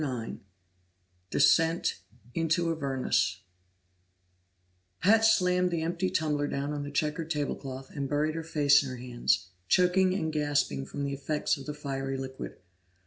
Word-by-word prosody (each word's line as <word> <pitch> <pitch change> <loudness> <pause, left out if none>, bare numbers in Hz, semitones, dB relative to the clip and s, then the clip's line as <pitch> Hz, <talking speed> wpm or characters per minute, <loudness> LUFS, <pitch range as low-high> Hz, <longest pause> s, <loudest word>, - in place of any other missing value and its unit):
9 125 -6 -4 0.9
Descent 165 - +3 0.3
into 165 +1 +1
Avernus 130 - 0 1.6
Pat 220 +4 +5
slammed 180 -4 +4
the 170 -2 -1
empty 175 +3 -1
tumbler 150 -4 0
down 140 +1 -2
on 145 - -3
the 145 - -5
checked 150 +2 -2
table 145 -2 -1
cloth 135 -1 -8
and 140 -2 -4
buried 150 +1 +1
her 165 - -3
face 145 -3 +4
in 140 - -5
her 130 - -6
hands, 120 -6 0 0.2
choking 185 - +3
and 160 -5 -2
gasping 145 - 0
from 140 - -5
the 140 0 -2
effects 150 +3 -1
of 140 -1 -10
the 150 - -3
fiery 135 -2 -3
liquor. 130 0 -6
150 Hz, 145 wpm, -29 LUFS, 135-165 Hz, 1.6 s, Pat